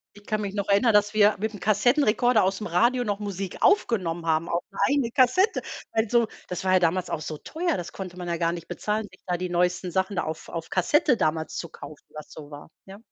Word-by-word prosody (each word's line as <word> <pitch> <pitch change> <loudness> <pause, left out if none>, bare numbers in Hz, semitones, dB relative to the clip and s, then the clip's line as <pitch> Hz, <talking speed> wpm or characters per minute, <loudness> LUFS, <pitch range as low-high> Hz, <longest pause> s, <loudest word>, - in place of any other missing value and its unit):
Ich 205 0 -17
kann 215 0 -1
mich 200 -2 -4
noch 200 -1 -3
erinnern, 210 +3 +4
dass 210 0 +3
wir 210 0 +5
mit 220 +2 -2
dem 205 - -9
Kassettenrekorder 240 +4 +3
aus'm 195 +3 -1
Radio 240 +8 +3
noch 205 -3 -2
Musik 195 -2 -5
aufgenommen 175 - +1
haben 160 +1 +1
auf 170 - -1
'ne 195 - -13
eigene 280 -4 +1
Kassette. 265 - +3 0.3
Weil 225 0 +1
so 235 -1 +3 0.2
das 180 - -5
war 185 0 +2
ja 185 - +6
damals 180 +1 0
auch 155 - -3
so 155 0 -5
teuer, 335 - -2
das 175 - -6
konnte 185 -2 -7
man 180 -1 -7
ja 170 0 -1
gar 165 0 +1
nicht 170 -1 -7
bezahlen, 210 0 -2
sich 185 - -19
da 180 -1 -1
die 180 +1 -4
neuesten 180 +1 0
Sachen 190 +3 -1
da - - 0
auf 160 0 -6
auf 165 -1 -6
Kassette 255 - +2
damals 160 +1 -1
zu 170 - -4
kaufen, 155 - -12
was 155 -1 -10
so 150 -1 -11
war. 145 +1 -10 0.2
Ja. 195 0 -11
195 Hz, 240 wpm, -25 LUFS, 175-220 Hz, 0.3 s, ja